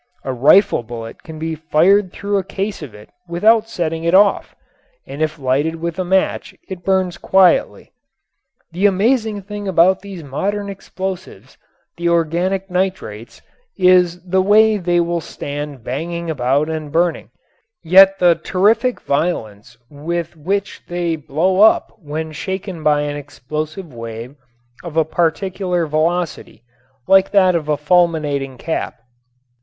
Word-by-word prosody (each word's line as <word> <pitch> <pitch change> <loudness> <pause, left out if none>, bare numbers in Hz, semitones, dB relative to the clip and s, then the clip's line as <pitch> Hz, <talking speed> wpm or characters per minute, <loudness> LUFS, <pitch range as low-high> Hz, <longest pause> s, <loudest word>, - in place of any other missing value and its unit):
A 130 - -2
rifle 140 - +4
bullet 115 -1 -9
can 160 -1 -10
be 160 +1 -3
fired 175 +5 +2
through 200 0 -2
a - - -4
case 195 +1 -4
of 130 -9 -9
it 105 +1 -15 0.2
without 220 +6 +3
setting 165 -6 -3
it 170 +2 +2
off, 200 +1 +3 0.5
and 140 +3 -8
if 155 0 -1
lighted 140 +4 0
with 170 +2 -5
a - - +1
match 190 +1 0
it 185 -2 -8
burns 185 -3 0
quietly. 190 -2 +2 0.8
The 185 +5 +2
amazing 215 +1 0
thing 205 +1 -7
about 185 +1 +4
these 195 -4 -9
modern 200 +9 -3
explosives, 185 - -7 0.4
the 170 0 0
organic 170 +3 0
nitrates, 180 - -4 0.3
is 180 -1 +4
the 190 +1 +1
way 215 +2 +4
they 175 -2 +1
will 170 0 -1
stand 145 -3 -7
banging 165 +6 -4
about 140 +1 0
and 155 -2 -5
burning, 170 +1 0 0.5
yet 190 +3 +6
the 175 -2 +5
terrific 205 +9 +1
violence 120 -8 -3
with 165 +4 -5
which 195 +6 -3
they 175 -1 -2
blow 165 +6 0
up 220 - +4
when 160 -1 -5
shaken 190 +1 -5
by 150 -1 +2
an 145 0 -3
explosive 155 +4 -6
wave 115 +2 -8 0.5
of 165 -2 -7
a 160 - +4
particular 175 +2 -1
velocity 160 -5 -2 0.4
like 195 0 +5
that 185 -3 +4
of 155 -3 -2
a 150 - +1
fulminating 150 -4 +1
cap. 160 +6 -4
170 Hz, 140 wpm, -18 LUFS, 150-190 Hz, 0.8 s, yet